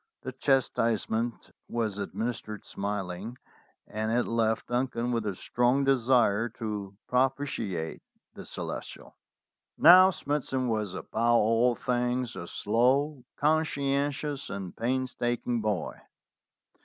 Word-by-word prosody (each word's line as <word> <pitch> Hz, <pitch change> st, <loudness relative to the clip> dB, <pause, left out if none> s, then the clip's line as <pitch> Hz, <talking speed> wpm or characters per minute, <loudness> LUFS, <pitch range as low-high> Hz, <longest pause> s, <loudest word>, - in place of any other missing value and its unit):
The 130 Hz, -, -4 dB
chas 135 Hz, 0 st, +2 dB
tisement 115 Hz, +1 st, -1 dB, 0.2 s
was 110 Hz, -4 st, -2 dB
administered 110 Hz, +1 st, -4 dB
smiling, 100 Hz, +3 st, -4 dB, 0.5 s
and 110 Hz, +1 st, -3 dB
it 120 Hz, +1 st, +2 dB
left 110 Hz, -1 st, +1 dB
Duncan 120 Hz, -1 st, -1 dB
with 115 Hz, -3 st, -1 dB
a 100 Hz, -, -2 dB
strong 125 Hz, +7 st, +1 dB
desire 120 Hz, -4 st, +3 dB
to 105 Hz, -3 st, -5 dB
propitiate 125 Hz, -, -1 dB, 0.3 s
the -, -, -9 dB
Celestial. -, -, -7 dB, 0.6 s
Now, 185 Hz, +2 st, +9 dB
Smithson 140 Hz, -6 st, -2 dB
was 105 Hz, -4 st, -1 dB
above -, -, -6 dB, 0.3 s
all 115 Hz, +2 st, +3 dB
things 125 Hz, 0 st, -1 dB
a 85 Hz, -, -6 dB
slow, 130 Hz, -, +1 dB
con 155 Hz, +2 st, +3 dB
scientious, 140 Hz, -1 st, -2 dB
and 95 Hz, -3 st, -6 dB
painstaking 120 Hz, -1 st, -1 dB
boy. 105 Hz, -5 st, -2 dB
120 Hz, 110 wpm, -28 LUFS, 110-130 Hz, 0.6 s, Now